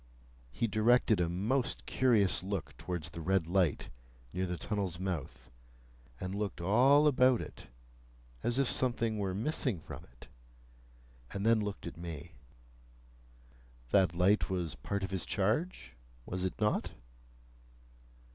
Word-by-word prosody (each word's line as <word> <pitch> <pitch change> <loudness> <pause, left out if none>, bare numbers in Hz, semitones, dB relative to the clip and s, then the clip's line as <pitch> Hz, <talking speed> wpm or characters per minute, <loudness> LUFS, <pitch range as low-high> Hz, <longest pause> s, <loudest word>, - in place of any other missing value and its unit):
He 90 - -1
directed 110 -1 +3
a 85 - +1
most 115 +9 -1
curious 105 -8 +3
look 95 -5 -4
towards 85 -2 -4
the 85 - -7
red 95 +1 +1
light 90 -2 +1 0.4
near 95 +1 -1
the 90 0 -3
tunnel's 95 -5 -3
mouth, 90 -6 -5 0.7
and 95 +1 -4
looked 100 -3 -3
all 125 - +5
about 130 -4 +5
it, - - -9 0.7
as 120 +1 -1
if 140 -2 +3
something 115 -4 +1
were 95 -2 -1
missing 125 - 0
from - - -9
it, - - -17 1.1
and 100 +1 -3
then 115 0 +5
looked 105 -2 -4
at 85 - -7
me. 85 -1 -7 1.6
That 95 -4 +4
light 95 +5 +3
was 90 -5 -2
part 100 -1 -4
of 95 - -3
his 95 -2 -1
charge? 110 - -1 0.3
Was 90 +1 -3
it 95 - -4
not? 105 -1 +1
100 Hz, 135 wpm, -32 LUFS, 90-115 Hz, 1.6 s, all